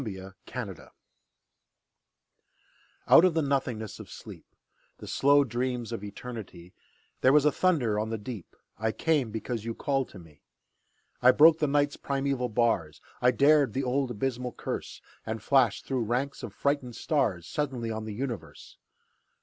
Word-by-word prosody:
The 95 -4 -7
Call - - -5 2.3
Out - - +8
of 185 -3 +3
the 160 - +2
nothingness 130 -6 -2
of - - -10
sleep, - - -11 0.5
The - - -10
slow 145 +1 +4
dreams 125 -1 -3
of 115 -3 -5
Eternity, 100 -4 -9 0.5
There 130 - +5
was 150 0 +5
a 150 - +5
thunder 135 - +1
on 110 +1 -2
the 115 - -2
deep: 105 -3 -8 0.2
I 110 0 0
came, 145 0 +1
because 110 +1 -4
you 115 0 -4
called 135 -2 -1
to - - -12
me. 80 -5 -16 0.8
I 125 - +7
broke 155 +4 +7
the 150 - +2
Night's 145 0 +1
primeval 135 -2 -1
bars, 105 -9 0 0.2
I 125 - +5
dared 140 -2 +4
the 135 - -1
old 130 +1 0
abysmal 125 +1 -3
curse, - - -6 0.2
And 110 0 -4
flashed 130 -5 +3
through 130 -4 -1
ranks 130 +5 -2
of - - -6
frightened 140 -4 -1
stars 110 - 0
Suddenly 125 - -3
on 110 0 -4
the 110 -2 -6
universe! 125 -2 -6
125 Hz, 155 wpm, -28 LUFS, 110-140 Hz, 2.3 s, Out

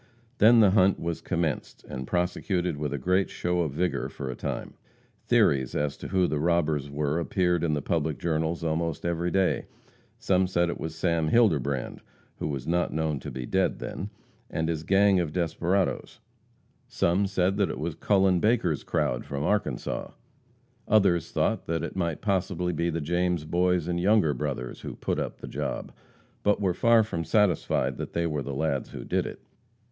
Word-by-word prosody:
Then 115 +2 +7
the 100 -3 +6
hunt 95 -1 +4
was 85 0 -3
commenced, 85 -5 -2
and 65 -1 -6
prosecuted 90 -1 -1
with 75 -1 -3
a 70 - -2
great 90 +7 +1
show 90 0 -1
of 80 -6 0
vigor 90 +4 -1
for 65 -2 -5
a - - -6
time. - - -4 0.5
Theories 65 -3 +3
as 75 -1 -1
to - - -7
who 95 -1 +2
the 75 -3 -1
robbers 80 -3 +1
were 75 +2 -1
appeared 90 0 +1
in 80 -3 +1
the 75 - -3
public - - -1
journals 80 0 -1
almost 80 -1 -1
every 85 0 0
day. 95 +1 +1 0.5
Some 95 -1 +2
said 85 -1 +1
it - - -6
was 80 0 -5
Sam 80 -1 +1
Hilderbrand 70 - +2 0.4
who - - -3
was 70 -3 -4
not 90 +1 +1
known 80 -2 -1
to - - -7
be 65 -1 -5
dead - - +1
then 100 - -5 0.4
and 80 0 -1
his 80 -2 -1
gang 95 +3 +4
of 80 -4 -2
desperadoes; 90 +2 -1 0.7
some 95 +4 +1
said 95 0 +1
that 100 -2 +2
it - - -4
was 80 +1 -3
Cullen 95 +2 +3
Baker's 105 - +1
crowd - - -1
from 70 0 -4
Arkansas; 105 +6 -1 0.8
others 95 -6 +3
thought - - 0
it 80 -2 -2
might 85 -4 -2
possibly 90 -3 0
be 85 +2 0
the 85 -1 -2
James 85 +1 0
Boys 90 0 +1
and 85 -1 -1
Younger 95 -4 +3
Brothers 65 -2 -4
who - - -6
"put - - -2
up - - -4
the - - -7
job," - - -4 0.5
but 105 0 +2
were 95 -3 +1
far 115 +4 +4
from 85 -6 -3
satisfied 90 0 +1
that - - -6
they 85 0 0
"were 75 -3 -1
the 70 +1 -5
lads 70 -2 -1
who - - -7
did - - 0
it." - - -8
85 Hz, 180 wpm, -27 LUFS, 75-95 Hz, 0.8 s, Then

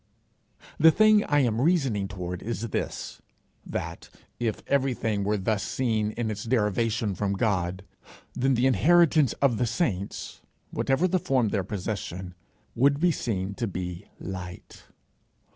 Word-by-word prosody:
The 160 - +8
thing 215 +4 +5
I 145 -1 +3
am 115 -2 +1
reasoning 135 - +2
toward 90 -2 -5
is 115 0 -4
this: - - -4 0.4
that, - - -5 0.3
if 115 -3 -2
everything 125 -7 0
were 105 +1 +1
thus 100 +1 0
seen 110 -4 -1
in 115 -2 -2
its 105 0 -5
derivation 115 -2 +1
from 100 +1 -1
God, 95 -3 -1 0.5
then 135 +1 +1
the 120 +2 +2
inheritance 150 - +4
of 125 -5 +4
the 120 - +1
saints, 110 - -2 0.3
whatever 135 +7 +1
the 185 0 +1
form 130 -7 +1
of 105 - -1
their 100 - 0
possession, 95 -2 -5 0.4
would 140 +3 +3
be 175 +2 +4
seen 100 - -2
to 120 +1 -3
be 90 0 -5
light. 90 -2 -8
110 Hz, 145 wpm, -27 LUFS, 100-135 Hz, 0.5 s, The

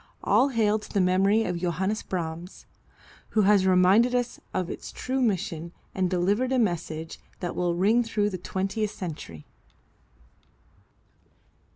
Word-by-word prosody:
All 270 - +4
hail 220 -4 +2
to - - -12
the 200 - +1
memory 195 +4 +3
of 180 -4 -2
Johannes 185 +5 -1
Brahms, 170 0 -5 0.7
who 215 - +5
has 195 -1 +4
reminded 190 +7 +4
us 245 -1 -1
of 185 -2 -2
its - - -7
true 260 +1 -2
mission 180 -7 -1 0.2
and 185 -1 0
delivered 200 +8 +1
a 260 - +2
message 165 -7 -2 0.2
that 175 - -4
will 175 -1 0
ring 210 +7 +3
through 210 -2 0
the 185 - -5
twentieth 195 +4 -2
century. 150 - -7
190 Hz, 140 wpm, -26 LUFS, 175-215 Hz, 0.7 s, who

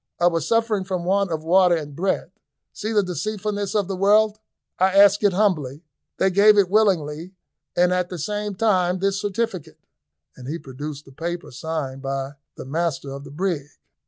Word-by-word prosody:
I 175 - +2
was 165 -3 +1
suffering 225 -3 +1
from 185 -2 -3
want 195 +1 +1
of 155 -1 -3
water 180 +1 +4
and 145 -3 -6
bread. 190 +4 -1 0.4
See 215 +2 -4
the 210 -2 +3
deceitfulness 205 +4 -3
of 205 -3 +1
the 195 - -3
world; 210 +3 +3 0.4
I 190 +1 +3
asked 200 +1 +6
it 205 - +5
humbly, 165 -8 0 0.3
they 190 - +2
gave 205 +3 +6
it 190 -3 +3
willingly, 180 -5 +1 0.4
and 180 +1 +4
at 180 -1 0
the 180 - -6
same 205 +5 -3
time 185 -4 +2
this 195 +2 0
certificate," 200 -6 -3 0.6
and 125 - -11
he 155 +4 -3
produced 145 +1 -8
the 135 - -15
paper 170 +5 -5
signed 140 -1 -4
by 135 0 -3 0.2
the - - -8
master 145 -1 -2
of 140 +1 -8
the - - -10
brig. 155 -1 -2
180 Hz, 180 wpm, -23 LUFS, 155-200 Hz, 0.6 s, asked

